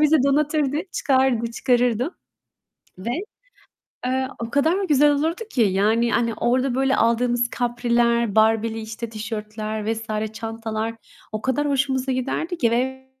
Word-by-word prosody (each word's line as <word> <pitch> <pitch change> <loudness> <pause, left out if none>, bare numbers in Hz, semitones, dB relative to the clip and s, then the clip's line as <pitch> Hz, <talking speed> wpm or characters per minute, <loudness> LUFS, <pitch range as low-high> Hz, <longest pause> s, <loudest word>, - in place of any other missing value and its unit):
bizi 305 +1 +5
donatırdı, 290 0 +1 0.2
çıkardı 260 -4 +2
çıkarırdı 245 - +1 0.8
ve, 190 +6 -4 1.0
eee, 260 +1 0
o 230 0 -4
kadar 320 +9 +2
güzel 295 0 +5
olurdu 320 +7 -1
ki. 250 - +2
Yani, 215 +4 +2
hani, 230 -1 +1
orada 250 +3 +1
böyle 270 +1 +2
aldığımız 240 +1 +2
kapriler, 235 -2 +1
Barbie'li 225 +1 +3
işte 220 +1 -6
tişörtler 215 0 -4
vs. 220 -1 -3
çantalar 225 0 -4 0.4
o 215 0 -4
kadar 280 +3 0
hoşumuza 265 -1 0
giderdi 275 +7 -2
ki. 235 -6 +2
Ve 265 +2 -1
240 Hz, 125 wpm, -23 LUFS, 225-265 Hz, 1.0 s, bizi